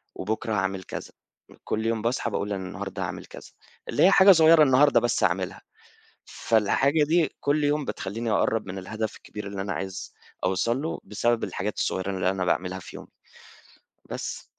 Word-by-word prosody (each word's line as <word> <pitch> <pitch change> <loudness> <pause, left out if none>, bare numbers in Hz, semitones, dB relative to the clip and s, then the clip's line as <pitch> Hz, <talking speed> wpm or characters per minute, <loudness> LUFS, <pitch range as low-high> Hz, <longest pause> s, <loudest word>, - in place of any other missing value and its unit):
وبُكرة 110 +3 -3
هاعمل 95 -1 -1
كذا، - - -7 0.5
كُلّ 110 +1 -2
يوم 115 -1 0
باصحى 115 +4 -1
باقول 105 +1 -2
أنا 95 -1 -4
النهارده 95 0 -6
هاعمل 85 - -5
كذا، - - -12 0.4
اللي - - +2
هي 190 - +7
حاجة 195 0 +8
صغيّرة 160 -2 +7
النهارده 140 +1 +5
بس 120 -3 0
أعملها، 90 +2 0 0.6
فالحاجة 135 +7 +2
دي 160 +1 +1
كُلّ 145 +1 +1
يوم 145 0 +1
بتخلّيني 115 +2 -4
أقرّب 110 0 +1
من 95 0 -6
الهدف 110 +3 -4
الكبير 105 -1 -9
اللي 100 -1 -4
أنا 100 -1 -3
عايز 95 0 -6 0.3
أوصل 115 +8 0
له، 160 - -3
بسبب 115 +3 0
الحاجات 100 +1 -4
الصغيّرة 95 +1 -1
اللي 95 -1 0
أنا 95 -1 -2
باعملها 90 +1 -1
في - - -10
يومي، - - -11 1.0
بس. - - -5
105 Hz, 170 wpm, -26 LUFS, 95-135 Hz, 1.0 s, حاجة